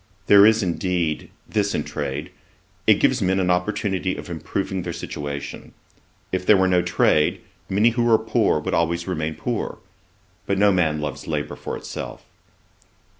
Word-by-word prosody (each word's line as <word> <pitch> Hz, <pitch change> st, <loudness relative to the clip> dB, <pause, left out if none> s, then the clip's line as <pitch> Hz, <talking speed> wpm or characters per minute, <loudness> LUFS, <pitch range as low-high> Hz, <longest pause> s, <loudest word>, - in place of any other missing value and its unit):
There 100 Hz, 0 st, +8 dB
is, 110 Hz, 0 st, +3 dB
indeed, 85 Hz, -3 st, -1 dB, 0.2 s
this 100 Hz, -2 st, 0 dB
in 75 Hz, -, -1 dB
trade: 75 Hz, -1 st, -4 dB, 0.6 s
it -, -, +7 dB
gives -, -, +2 dB
men 95 Hz, +1 st, +2 dB
an 90 Hz, -1 st, +2 dB
opportunity 95 Hz, 0 st, -1 dB
of -, -, -8 dB
improving 95 Hz, +3 st, -3 dB
their 85 Hz, 0 st, -4 dB
situation. 70 Hz, -4 st, -6 dB, 0.6 s
If 95 Hz, 0 st, -1 dB
there 105 Hz, +2 st, +6 dB
were 95 Hz, 0 st, +3 dB
no 90 Hz, -1 st, +3 dB
trade, 90 Hz, -3 st, +2 dB, 0.3 s
many 105 Hz, +4 st, +4 dB
who 120 Hz, 0 st, +1 dB
are 110 Hz, -, +6 dB
poor 110 Hz, -6 st, +1 dB
would 75 Hz, -, -4 dB
always 85 Hz, +1 st, 0 dB
remain 80 Hz, -3 st, -2 dB
poor. 120 Hz, +8 st, -3 dB, 0.7 s
But 100 Hz, -, +1 dB
no 100 Hz, +1 st, +5 dB
man 80 Hz, -5 st, +1 dB
loves 75 Hz, -3 st, -5 dB
labour 75 Hz, -2 st, -3 dB
for -, -, -5 dB
itself.' -, -, -7 dB
90 Hz, 160 wpm, -23 LUFS, 80-100 Hz, 0.7 s, There